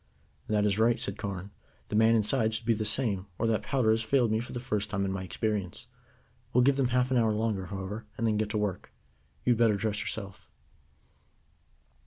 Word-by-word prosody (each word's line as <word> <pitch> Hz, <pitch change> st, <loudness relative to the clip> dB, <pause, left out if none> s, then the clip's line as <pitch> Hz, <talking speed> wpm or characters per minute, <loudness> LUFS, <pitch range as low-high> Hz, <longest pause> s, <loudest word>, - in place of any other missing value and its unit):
"That 105 Hz, -1 st, +2 dB
is 105 Hz, 0 st, +1 dB
right," 115 Hz, +1 st, +3 dB
said 100 Hz, -, -4 dB
Carne. 100 Hz, 0 st, -5 dB, 0.4 s
"The -, -, -2 dB
man 110 Hz, +1 st, +5 dB
inside 110 Hz, 0 st, +2 dB
should 115 Hz, -, -4 dB
be 115 Hz, -, +3 dB
the 110 Hz, 0 st, -2 dB
same, 105 Hz, -4 st, +1 dB
or 115 Hz, -, -1 dB
that 115 Hz, -1 st, +1 dB
powder 130 Hz, -5 st, +1 dB
has 110 Hz, +1 st, +2 dB
failed 120 Hz, 0 st, +2 dB
me 110 Hz, -, +2 dB
for 120 Hz, -, -6 dB
the 120 Hz, -, -4 dB
first 105 Hz, -4 st, -2 dB
time 100 Hz, -1 st, -1 dB
in 95 Hz, -, -1 dB
my 95 Hz, -1 st, -3 dB
experience. 105 Hz, +1 st, -3 dB, 0.7 s
We'll 125 Hz, -, +5 dB
give 140 Hz, +1 st, +3 dB
them 135 Hz, -2 st, +2 dB
half 125 Hz, +1 st, +1 dB
an 130 Hz, -, +3 dB
hour 110 Hz, -2 st, +3 dB
longer, 105 Hz, -4 st, -1 dB
however, 100 Hz, +3 st, -6 dB
and 115 Hz, -, -1 dB
then 110 Hz, -2 st, +2 dB
get 105 Hz, 0 st, -1 dB
to 105 Hz, -, -1 dB
work. 105 Hz, -3 st, -3 dB, 0.5 s
You 125 Hz, -, +5 dB
had 115 Hz, -, -4 dB
better 115 Hz, -3 st, +4 dB
dress 105 Hz, +1 st, -1 dB
yourself." 100 Hz, -3 st, -6 dB
110 Hz, 215 wpm, -29 LUFS, 100-115 Hz, 0.7 s, man